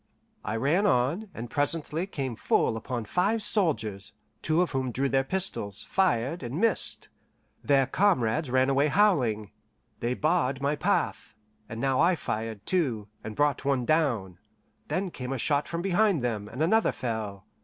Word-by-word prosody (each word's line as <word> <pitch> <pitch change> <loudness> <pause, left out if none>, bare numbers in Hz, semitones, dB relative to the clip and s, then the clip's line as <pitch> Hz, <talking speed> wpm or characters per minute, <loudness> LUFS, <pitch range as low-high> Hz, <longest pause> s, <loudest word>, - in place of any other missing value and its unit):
I 105 - -3
ran 155 - +2
on, 165 - +1
and 120 -6 -7
presently 155 +4 0
came 135 - -4
full 110 - +1
upon 120 0 -4
five 200 - +1
soldiers, 115 - 0 0.3
two 160 +3 +2
of 180 - -4
whom 130 -2 -1
drew 135 +3 0
their 135 0 +2
pistols, 135 - -3
fired, 165 -5 +1
and 130 +5 -4
missed. 225 -2 +1 0.5
Their 140 -2 +4
comrades 135 - +1
ran 130 +1 +3
away 140 +2 +3
howling. 130 - +2 0.5
They 120 +1 -1
barred 150 -4 +1
my 140 +2 0
path, - - -1 0.3
and 115 - -6
now 135 0 +1
I 175 +3 +4
fired, 110 -7 -4
too, 125 - 0
and 110 - -6
brought 145 -1 +1
one 135 -3 +1
down; 120 - 0 0.5
then 185 -1 -2
came 125 -3 -6
a - - -2
shot 145 +4 +1
from 170 0 -4
behind 195 - +2
them, 110 -4 -2
and 130 +7 -2
another 220 +7 +3
fell. 110 -5 -4
135 Hz, 160 wpm, -27 LUFS, 115-170 Hz, 0.5 s, Their